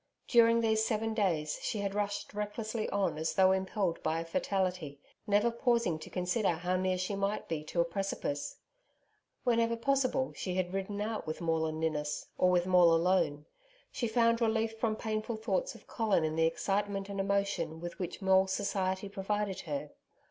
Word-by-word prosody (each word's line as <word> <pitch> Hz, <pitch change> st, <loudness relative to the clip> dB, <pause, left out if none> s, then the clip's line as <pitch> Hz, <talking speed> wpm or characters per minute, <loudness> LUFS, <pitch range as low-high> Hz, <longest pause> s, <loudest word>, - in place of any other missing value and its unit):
During 230 Hz, -1 st, +5 dB
these 220 Hz, -1 st, +2 dB
seven 225 Hz, 0 st, 0 dB
days 170 Hz, -8 st, 0 dB
she 220 Hz, -, -2 dB
had 200 Hz, -1 st, -2 dB
rushed 205 Hz, 0 st, -2 dB
recklessly 215 Hz, +2 st, -3 dB
on 195 Hz, -6 st, 0 dB
as 160 Hz, -, -1 dB
though 190 Hz, 0 st, +6 dB
impelled 190 Hz, -1 st, -1 dB
by 160 Hz, +1 st, 0 dB
a 165 Hz, -, -4 dB
fatality, 180 Hz, -4 st, -1 dB, 0.3 s
never 210 Hz, +3 st, +3 dB
pausing 235 Hz, -8 st, +1 dB
to -, -, -9 dB
consider 180 Hz, +2 st, 0 dB
how 180 Hz, +3 st, -1 dB
near 185 Hz, 0 st, +1 dB
she 185 Hz, +2 st, -2 dB
might 200 Hz, +1 st, -1 dB
be 155 Hz, -2 st, -3 dB
to 170 Hz, +2 st, 0 dB
a -, -, +2 dB
precipice. 170 Hz, -5 st, -3 dB, 0.9 s
Whenever 230 Hz, -1 st, +2 dB
possible, 265 Hz, +1 st, +1 dB
she 180 Hz, -2 st, -3 dB
had 185 Hz, -1 st, -1 dB
ridden 195 Hz, +1 st, -3 dB
out 215 Hz, -3 st, -3 dB
with 155 Hz, -, -3 dB
Maule 160 Hz, -1 st, +1 dB
and 155 Hz, 0 st, -4 dB
Ninnis, 150 Hz, -2 st, -2 dB
or 180 Hz, -, +3 dB
with 180 Hz, -1 st, +3 dB
Maule 180 Hz, -2 st, +6 dB
alone. 165 Hz, -4 st, +1 dB, 0.5 s
She 235 Hz, -, -2 dB
found 230 Hz, +1 st, +3 dB
relief 225 Hz, 0 st, +1 dB
from 220 Hz, -2 st, +1 dB
painful 220 Hz, +1 st, -3 dB
thoughts -, -, -1 dB
of -, -, -15 dB
Colin 215 Hz, -7 st, +1 dB
in 155 Hz, 0 st, -1 dB
the 165 Hz, 0 st, +4 dB
excitement 195 Hz, +3 st, -1 dB
and 200 Hz, -1 st, -5 dB
emotion 195 Hz, -5 st, 0 dB
with 175 Hz, +1 st, -7 dB
which 180 Hz, +2 st, -5 dB
Maule's 190 Hz, 0 st, +4 dB
society 190 Hz, -1 st, -1 dB
provided 200 Hz, 0 st, -2 dB
her. 150 Hz, -2 st, -4 dB
195 Hz, 175 wpm, -32 LUFS, 170-220 Hz, 0.9 s, though